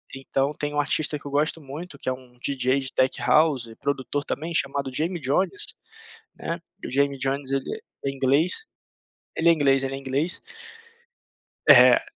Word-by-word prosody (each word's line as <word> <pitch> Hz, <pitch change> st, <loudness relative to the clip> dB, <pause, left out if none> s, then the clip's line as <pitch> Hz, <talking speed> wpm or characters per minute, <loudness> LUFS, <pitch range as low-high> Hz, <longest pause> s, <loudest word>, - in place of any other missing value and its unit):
Então 135 Hz, +2 st, -1 dB
tem 145 Hz, 0 st, -4 dB
um 145 Hz, -, 0 dB
artista 150 Hz, 0 st, 0 dB
que -, -, -22 dB
eu 140 Hz, -, -7 dB
gosto 155 Hz, +3 st, +1 dB
muito 150 Hz, +3 st, -8 dB
que -, -, -12 dB
é 130 Hz, -, +2 dB
um 125 Hz, -1 st, -14 dB
DJ 130 Hz, +1 st, 0 dB
de 135 Hz, -1 st, -5 dB
tech 130 Hz, 0 st, +2 dB
house 150 Hz, -6 st, +3 dB
e 115 Hz, -, -12 dB
produtor 140 Hz, +1 st, -2 dB
também, 165 Hz, +4 st, -4 dB
chamado 140 Hz, -2 st, -1 dB
Jamie 170 Hz, +5 st, -1 dB
Jones, 185 Hz, -, 0 dB, 0.7 s
né, 170 Hz, +1 st, -4 dB, 0.2 s
o -, -, -4 dB
Jamie 140 Hz, +1 st, +2 dB
Jones 135 Hz, 0 st, -2 dB
ele 135 Hz, -, -2 dB, 0.2 s
é 140 Hz, -, +1 dB
inglês 140 Hz, -, +1 dB, 0.7 s
ele 170 Hz, +1 st, +4 dB
é -, -, +8 dB
inglês 135 Hz, -3 st, +3 dB
ele 135 Hz, 0 st, -2 dB
é -, -, -5 dB
inglês. 140 Hz, +5 st, -1 dB, 1.3 s
É. -, -, +9 dB
140 Hz, 175 wpm, -25 LUFS, 135-155 Hz, 1.3 s, É